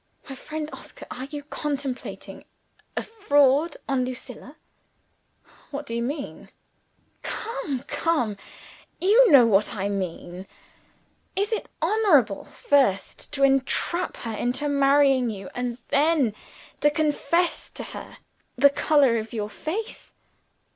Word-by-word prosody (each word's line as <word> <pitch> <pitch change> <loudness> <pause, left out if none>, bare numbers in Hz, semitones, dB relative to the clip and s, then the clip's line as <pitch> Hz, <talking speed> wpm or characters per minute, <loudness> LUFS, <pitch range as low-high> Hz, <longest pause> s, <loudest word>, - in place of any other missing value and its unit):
"My 275 - -6
friend 305 +3 -5
Oscar, - - -11
are 255 - -5
you 290 +1 -7
contemplating 285 -3 -5 0.5
a - - 0
fraud 295 - +2
on 270 -2 +1
Lucilla?" 255 0 -8 1.1
"What 290 0 -5
do 230 - -5
you 235 - -1
mean?" 275 +4 -5 0.7
"Come! 295 - -4
come! 250 -11 0 0.6
you 445 +7 +6
know 265 -5 +9
what 210 0 +2
I 200 0 -2
mean! 185 -1 -5 0.9
Is 405 +3 0
it 445 - -2
honorable 315 - +3
first 260 -10 0
to 275 -1 0
entrap 275 +6 +1
her 230 -2 -5
into 250 +6 -1
marrying 275 -3 +4
you 195 -3 -7
and 245 -1 -3
then 290 -6 +3 0.5
to 295 - +4
confess 310 +3 0
to - - -8
her - - -9 0.4
the 280 +3 +6
color 280 -5 +3
of 220 +1 -5
your 210 -2 -3
face?" 425 - -6
275 Hz, 120 wpm, -25 LUFS, 240-305 Hz, 1.1 s, know